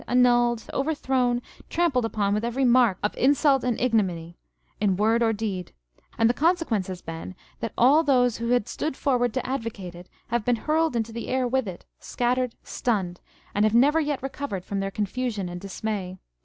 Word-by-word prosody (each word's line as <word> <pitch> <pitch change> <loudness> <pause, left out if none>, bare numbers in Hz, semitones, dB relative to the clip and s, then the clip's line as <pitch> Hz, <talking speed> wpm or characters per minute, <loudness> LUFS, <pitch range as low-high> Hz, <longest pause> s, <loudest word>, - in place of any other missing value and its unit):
527 245 +1 +2 0.6
upon 210 -3 0
with 210 +2 0
every 245 +3 0
mark 240 -6 +4
of 210 - 0
insult 275 0 +3
and 245 -2 0
ignominy, 185 -9 0 0.4
in 195 -3 +1
word 225 +3 +2
or 225 -1 +3
deed; 205 -5 -4 0.4
and 225 - +4
the 240 - +3
consequence 315 - +1
has 185 -2 -7
been 165 +3 -7 0.2
that 230 - -3
all 275 +6 +6
those 250 -6 +2
who 235 - -3
had 245 -3 +2
stood 305 -3 -3
forward 245 -4 +1
to 255 +2 -3
advocate 225 -8 -4
it 175 +1 -12 0.2
have 235 -1 0
been 245 +2 +2
hurled 310 +4 0
into 225 -1 -1
the 230 +1 -6
air 255 -1 0
with 260 -2 0
it, 180 -2 -8
scattered, 250 0 -1
stunned, 190 -7 -2 0.3
and 205 - +2
have 215 +1 +3
never 290 +6 +5
yet 290 -4 -2
recovered 270 -9 -4
from 200 - -3
their 195 0 -1
confusion 210 0 -2
and 175 0 -7
dismay. 195 -1 -4
235 Hz, 175 wpm, -25 LUFS, 200-255 Hz, 0.6 s, all